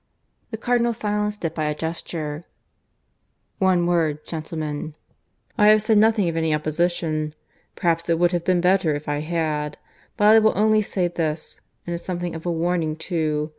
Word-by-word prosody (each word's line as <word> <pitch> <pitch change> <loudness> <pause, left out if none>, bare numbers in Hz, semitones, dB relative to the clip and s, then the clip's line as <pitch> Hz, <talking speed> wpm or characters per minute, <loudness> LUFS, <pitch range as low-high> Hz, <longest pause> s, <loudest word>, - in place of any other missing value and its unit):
The 220 - -5
Cardinal 235 0 +1
silenced 210 -2 -2
it 165 - -1
by 155 -2 -2
a 150 0 -1
gesture. 160 -1 -5 1.1
"One 185 -3 +3
word, 160 -4 0
gentlemen.... 155 -2 -5 0.6
I 210 - +6
have 215 0 +6
said 215 -1 +4
nothing 215 -3 +3
of 165 - -2
any 160 -1 +1
opposition. 155 0 -1 0.4
Perhaps 170 -1 0
it 165 - +3
would 175 +1 +3
have 175 -2 -1
been 180 -1 +2
better 180 -4 +3
if 145 +2 -7
I 145 0 -1
had. 155 -2 -2 0.4
But 205 - +2
I 220 +1 +8
will 220 -3 +2
only 215 +1 +4
say 190 -3 -1
this, 160 -2 -4 0.2
and 175 - -3
it - - -2
is - - -16
something 175 -1 -3
of 165 +1 -6
a - - +1
warning 165 -1 0
too. 155 -3 -2
170 Hz, 175 wpm, -23 LUFS, 155-190 Hz, 1.1 s, I